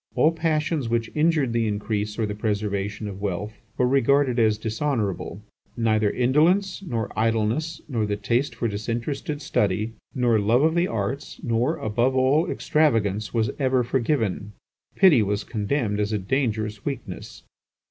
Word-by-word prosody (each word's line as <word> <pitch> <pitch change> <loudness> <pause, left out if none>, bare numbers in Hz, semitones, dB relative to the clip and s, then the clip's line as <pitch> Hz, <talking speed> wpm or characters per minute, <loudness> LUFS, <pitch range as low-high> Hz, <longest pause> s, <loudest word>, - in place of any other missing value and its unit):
All 150 +6 +4
passions 160 -4 -1
which 115 -1 -1
injured 150 -5 +2
the 115 -1 +1
increase 105 0 -2
or 115 - +1
the 105 - -3
preservation 105 0 -2
of 100 -1 -7
wealth, 105 +2 -3 0.2
were 125 - +3
regarded 135 -1 +3
as 110 -2 +3
dishonourable; 110 -3 -2 0.3
neither 110 -2 +2
indolence, 165 - +2
nor 115 - -3
idleness, 115 +8 0
nor 115 -7 -1
the 105 - -1
taste 120 +5 -1
for 115 0 -1
disinterested 120 - -3
study, 105 -3 0 0.2
nor 120 -4 +3
love 115 +6 +3
of 160 +1 +3
the 175 +1 +2
arts, 115 +6 -4
nor, 120 +7 0
above 120 +3 0
all, 135 +6 +3
extravagance, 110 -9 +1
was 115 -2 0
ever 130 -2 +2
forgiven; 115 -5 -1 0.4
pity 180 - +6
was 100 0 -1
condemned 105 -1 -1
as 105 +1 0
a 105 - +1
dangerous 110 -1 -1
weakness. 125 -10 -6
115 Hz, 145 wpm, -24 LUFS, 105-140 Hz, 0.4 s, pity